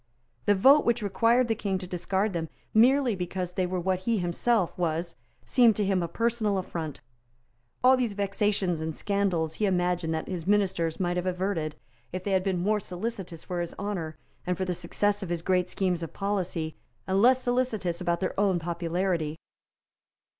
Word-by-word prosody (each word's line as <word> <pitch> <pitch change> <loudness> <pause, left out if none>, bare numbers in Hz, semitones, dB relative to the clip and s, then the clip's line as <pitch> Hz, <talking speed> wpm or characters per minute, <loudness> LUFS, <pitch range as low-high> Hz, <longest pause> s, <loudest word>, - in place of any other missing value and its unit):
The 205 - +5
vote 270 +10 +6
which 235 -1 +1
required 230 +5 +3
the 225 - +2
King 200 -3 -2
to 185 - -6
discard 190 +3 -1
them 165 -2 -3 0.2
merely 250 +1 +5
because 180 0 -3
they 185 0 0
were 185 0 -2
what 185 +1 0
he 225 +4 0
himself 185 +2 +1
was 170 0 -2 0.3
seemed 235 -4 +5
to 210 - 0
him 190 -2 +1
a 170 - -1
personal 220 +1 0
affront. 165 -5 -4 0.8
All 260 +1 +7
these 245 -5 -1
vexations 200 -3 0
and 160 -1 -3
scandals 190 -6 0
he 210 +5 0
imagined 180 -3 0
that 160 - -4
his 180 -2 -5
ministers 185 -5 +1
might 175 -1 0
have 180 +1 -1
averted, 180 -4 -1 0.4
if 185 - -4
they 200 - -2
had 190 -1 +2
been 185 -3 0
more 210 +2 +2
solicitous 185 -3 -5
for 175 -1 -3
his 170 - -5
honour 175 -6 -4 0.3
and 180 -1 0
for 190 - -1
the 180 - -1
success 205 +4 0
of 190 - -5
his 170 -1 -2
great 180 -1 +1
schemes 180 -2 0
of 165 - -6
policy, 185 -5 -2 0.3
and 190 +1 +1
less 255 +2 +5
solicitous 230 -9 0
about 170 0 0
their 185 - -1
own 195 -3 +3
popularity. 170 -1 -1
185 Hz, 180 wpm, -28 LUFS, 175-205 Hz, 0.8 s, All